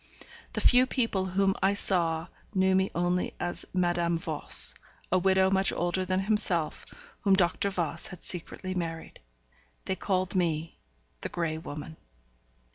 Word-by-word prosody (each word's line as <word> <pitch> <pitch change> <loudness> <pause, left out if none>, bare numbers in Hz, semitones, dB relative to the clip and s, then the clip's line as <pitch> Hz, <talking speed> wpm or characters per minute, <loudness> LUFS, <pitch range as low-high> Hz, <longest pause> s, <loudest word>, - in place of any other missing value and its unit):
The - - -2
few 250 +1 +6
people 230 -8 0
whom 195 +1 +1
I 195 +2 +3
saw 165 -5 0 0.3
knew 190 0 +3
me 190 +1 +2
only 175 +1 0
as 175 0 -2
Madame 175 -2 +1
Voss; 160 -2 +3 0.4
a 185 - +4
widow 190 +1 +3
much 195 0 +2
older 175 +2 -1
than 185 +1 0
himself, 190 -6 +1 0.3
whom 195 -2 +4
Dr. 190 +2 +1
Voss 170 -4 -3
had 180 - -11
secretly 185 +1 -4
married. 165 -3 -5 0.7
They 190 - -1
called 185 -2 -1
me 165 -3 -1 0.4
the - - -4
Grey 160 -2 -2
Woman. 155 0 -8
180 Hz, 140 wpm, -28 LUFS, 170-190 Hz, 0.7 s, few